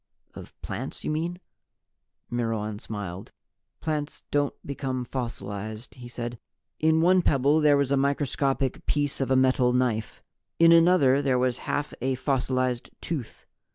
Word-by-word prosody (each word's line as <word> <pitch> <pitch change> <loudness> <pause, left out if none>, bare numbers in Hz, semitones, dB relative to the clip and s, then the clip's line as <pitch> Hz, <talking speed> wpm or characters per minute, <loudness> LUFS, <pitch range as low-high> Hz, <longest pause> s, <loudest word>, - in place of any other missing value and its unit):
"Of - - -12
plants, 120 +8 -5
you - - -1
mean?" 170 +3 -2 0.9
Myrwan 110 -3 -2
smiled. 100 -4 -6 0.5
"Plants 150 -1 -3
don't 145 -1 +1
become 130 -2 -3
fossilized," 110 -3 -5
he 125 -2 -10
said. 120 -1 -6 0.4
"In 160 +1 +3
one 180 +2 +5
pebble 145 0 +3
there 150 -1 +5
was 140 -1 +1
a 140 - +3
microscopic 135 -1 0
piece 145 -2 0
of 135 - 0
a 130 - +4
metal 130 -1 +3
knife. 120 -3 -1 0.3
In 165 0 +7
another 165 -5 +5
there 135 -3 +2
was 125 -1 +1
half 145 +1 -1
of - - -13
a 130 +1 0
fossilized 130 -2 -1
tooth. 145 -9 -5
130 Hz, 145 wpm, -26 LUFS, 120-145 Hz, 0.9 s, In